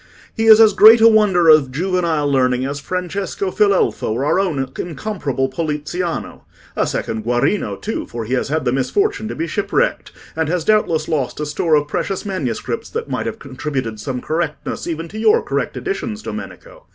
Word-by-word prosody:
"He 225 -1 0
is 220 0 +9
as 220 -2 +6
great 220 +3 +8
a 225 - +7
wonder 205 -6 +4
of 155 -4 +6
juvenile 170 -1 0
learning 130 -2 +1
as 140 +1 -4
Francesco 185 +3 -3
Filelfo 200 -2 +1
or 130 +5 -2
our 150 - +2
own 140 -9 -1
incomparable 155 - -3
Poliziano. 155 +4 -4 0.3
A - - +1
second 110 -1 -3
Guarino, 120 - 0
too, 220 - -4
for 115 -1 -6
he 120 - -3
has 130 - 0
had 155 +2 -1
the 120 - +2
misfortune 400 - 0
to - - -5
be 165 - -2
shipwrecked, 210 - -1 0.2
and 160 -1 -1
has 175 -1 -1
doubtless 170 -8 +2
lost 145 -5 -2
a 150 - -2
store 155 +2 +1
of 145 -1 +1
precious 195 +6 -3
manuscripts 165 - -3
that - - -5
might - - -2
have - - -4
contributed 130 -4 -5
some 125 +3 -4
correctness 160 0 -3
even 165 0 -4
to 215 +5 -8
your 430 - +3
correct - - -2
editions, 230 - -4
Domenico. - - -9
165 Hz, 180 wpm, -19 LUFS, 140-205 Hz, 0.3 s, is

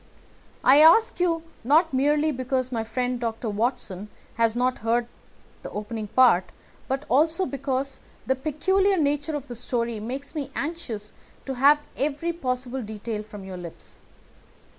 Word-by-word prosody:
I 280 - +7
ask 440 +10 +6
you 335 -2 +1 0.2
not 310 +5 +4
merely 295 +3 +2
because 255 -1 -2
my 230 -2 -1
friend 245 +2 -2
Dr. 225 -1 -3
Watson 210 -3 -2 0.2
has 230 -1 +2
not 250 +1 +1
heard 235 +2 +1 0.6
the - - -7
opening 210 +1 -5
part 235 -6 +5 0.4
but 270 +2 -2
also 320 +7 +3
because 275 -2 -3 0.3
the 265 - +2
peculiar 375 +8 +1
nature 295 0 0
of 285 -2 -4
the 245 -3 -8
story 235 -1 -2
makes 265 +7 -5
me 290 -4 -4
anxious 270 -10 -5 0.3
to 270 - -3
have 285 +4 +5
every 300 +4 -1
possible 255 -4 -3
detail 215 0 -5
from 210 -2 -10
your 190 -1 -7
lips. 175 -2 -10
260 Hz, 145 wpm, -25 LUFS, 230-295 Hz, 0.6 s, I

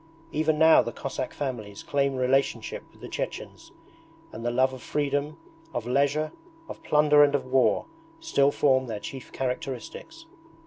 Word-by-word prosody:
Even 155 0 +1
now 160 +1 +7
the 120 - -4
Cossack 130 0 -4
families 110 -8 -5
claim 140 -1 0
relationship 130 +2 0
with - - -22
the - - -7
Chechens, - - -6 0.6
and 115 - -8
the 120 - 0
love 130 +2 +2
of 130 - -9
freedom, 145 +1 -1 0.4
of 115 - -2
leisure, 145 +4 +1 0.4
of - - -9
plunder 150 0 +5
and 145 0 +3
of 140 - -1
war, 130 -4 +2 0.3
still 140 - +2
form 130 -3 +2
their 110 -3 -4
chief 135 +4 -8
characteristics. 135 - -5
135 Hz, 150 wpm, -26 LUFS, 130-150 Hz, 0.6 s, now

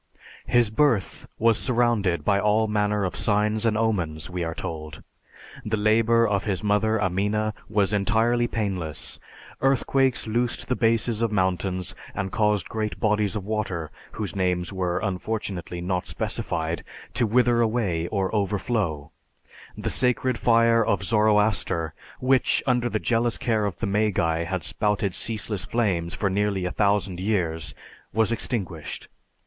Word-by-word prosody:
His 120 -3 +3
birth 115 -5 +1
was 115 -1 +3
surrounded 120 -8 +1
by 100 -1 +3
all 105 +2 +2
manner 105 -1 +1
of 90 - -3
signs 105 +1 +1
and 110 -1 +1
omens, 90 -8 -1
we 90 -1 -2
are 80 0 -3
told. 80 -1 -6 0.6
The 110 0 -1
labor 115 +2 +3
of 100 -2 0
his 100 -1 -2
mother, 110 +1 +2
Amina, 105 +3 0 0.2
was 105 -1 +1
entirely 110 +4 +2
painless, 95 -9 -3 0.4
earthquakes 135 -1 +2
loosed 120 +2 -1
the 125 - +1
bases 115 -1 +1
of 115 -2 +1
mountains 95 -2 0 0.2
and 95 -1 -3
caused 105 -3 +1
great 110 -1 -3
bodies 105 -3 +1
of 100 -3 -4
water, 95 -7 -3 0.2
whose 105 -3 -4
names 90 -1 0
were 90 -2 -1
unfortunately 95 -3 -3
not 90 0 -2
specified, 80 -1 -2 0.3
to 120 - +1
wither 120 +1 +3
away 105 -8 0
or 95 0 -1
overflow; 100 -7 -1 0.7
the - - -2
sacred 125 -1 +1
fire 115 0 +4
of 100 -2 0
Zoroaster 105 -6 +2 0.3
which, 130 0 +2
under 125 -2 +1
the 110 - 0
jealous 115 +1 +1
care 110 -3 0
of 95 - -4
the - - -2
Magi, 95 -5 +1
had 95 -1 -3
spouted 105 -1 0
ceaseless 105 -2 0
flames 90 -8 -1
for 100 - 0
nearly 100 -1 0
a 90 - -2
thousand 100 -3 +1
years, 90 -6 -1 0.4
was 110 +1 +1
extinguished. 95 -9 -3
105 Hz, 145 wpm, -25 LUFS, 95-115 Hz, 0.7 s, fire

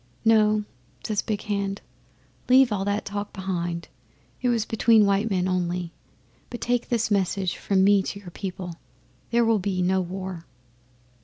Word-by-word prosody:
'"No," 215 -1 +4 0.4
says 215 -2 0
Big 210 -1 -3
Hand. 200 -1 -2 0.7
"Leave 260 -1 +6
all 195 -2 0
that 205 +1 -1
talk 205 0 -4
behind 175 -3 -3 0.5
it 250 - +1
was 230 -3 +1
between 225 -1 +4
white 200 +3 +2
men 185 -2 0
only 180 -1 -1 0.6
but 240 - -6
take 245 0 -1
this 230 -2 0
message 190 -2 0
from 190 -2 +1
me 200 0 +5
to 200 - -5
your 185 -3 -11
people 185 -2 -6 0.6
'There 235 0 +3
will 225 -2 +3
be 185 -1 -1
no 190 +1 +2
war. 185 -1 -6
200 Hz, 155 wpm, -25 LUFS, 185-215 Hz, 0.7 s, Leave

